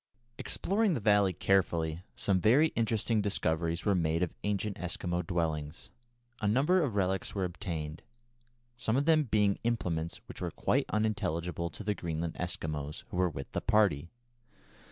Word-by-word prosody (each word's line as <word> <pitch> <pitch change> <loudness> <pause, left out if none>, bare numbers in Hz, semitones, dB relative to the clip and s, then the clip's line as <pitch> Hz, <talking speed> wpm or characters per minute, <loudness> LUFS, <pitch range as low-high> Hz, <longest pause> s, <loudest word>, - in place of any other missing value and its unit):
Exploring 200 -1 +1
the - - -1
valley 105 -2 +4
carefully, 85 -4 +1
some 95 -3 +1
very 135 - +5
interesting 110 -1 +1
discoveries 85 -4 0
were 100 - +4
made 85 -1 +1
of 90 - -2
ancient 105 0 -1
Eskimo 90 -1 -2
dwellings. 80 -2 -3 0.5
A 105 - +1
number 145 - +3
of 130 -10 -1
relics 95 0 0
were 95 - 0
obtained, 85 -4 -4 0.8
some 115 +1 +1
of 140 - +1
them 155 -2 +4
being 105 -4 +2
implements 85 -9 -1
which - - -9
were - - -1
quite - - 0
unintelligible 90 -5 -1
to 95 - -9
the 105 +1 0
Greenland 85 -2 -3
Eskimos 75 -4 -4
who - - -4
were 90 -1 +3
with 70 -4 -7
the - - -2
party. 100 -8 +2
95 Hz, 155 wpm, -31 LUFS, 85-110 Hz, 0.8 s, very